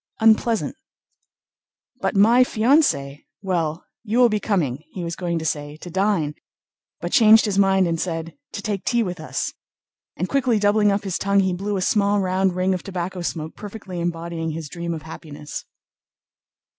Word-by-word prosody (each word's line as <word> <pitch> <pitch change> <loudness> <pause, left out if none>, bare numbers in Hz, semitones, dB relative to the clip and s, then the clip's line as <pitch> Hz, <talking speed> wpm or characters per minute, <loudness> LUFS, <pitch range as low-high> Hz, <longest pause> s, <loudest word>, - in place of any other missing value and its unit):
Unpleasant... 225 0 +3 1.2
But - - -1
my 230 +6 +6
fiancée!... 215 - +2 0.2
Well, 170 -4 -1 0.2
you 225 +1 -1
will 245 -1 +6
be 215 -1 0
coming," 165 - 0
he 180 - -5
was 170 0 -3
going 175 -2 -2
to 160 - -4
say, 145 -1 -3
"to 175 +2 -9
dine," 190 -5 +1 0.7
but - - -3
changed 220 -2 +7
his 200 -2 0
mind 195 -2 +4
and 165 -1 -1
said 165 -2 -3 0.2
"to - - -5
take 205 -4 -2
tea 240 -2 +2
with 180 -4 -4
us," 155 - -3 0.6
and 180 - -1
quickly 255 -3 +2
doubling 205 0 +3
up 200 0 0
his 190 -3 -2
tongue 200 0 +3
he 190 -1 +1
blew 200 +3 -2
a - - -2
small 205 0 +2
round 185 -1 +1
ring 185 +1 +1
of 180 - -3
tobacco 185 -1 -4
smoke, 160 -2 -4
perfectly 200 -4 -7
embodying 170 -1 -3
his 160 -1 -5
dream 170 0 -4
of 155 - -8
happiness. 150 -2 -8
185 Hz, 170 wpm, -22 LUFS, 165-210 Hz, 1.2 s, changed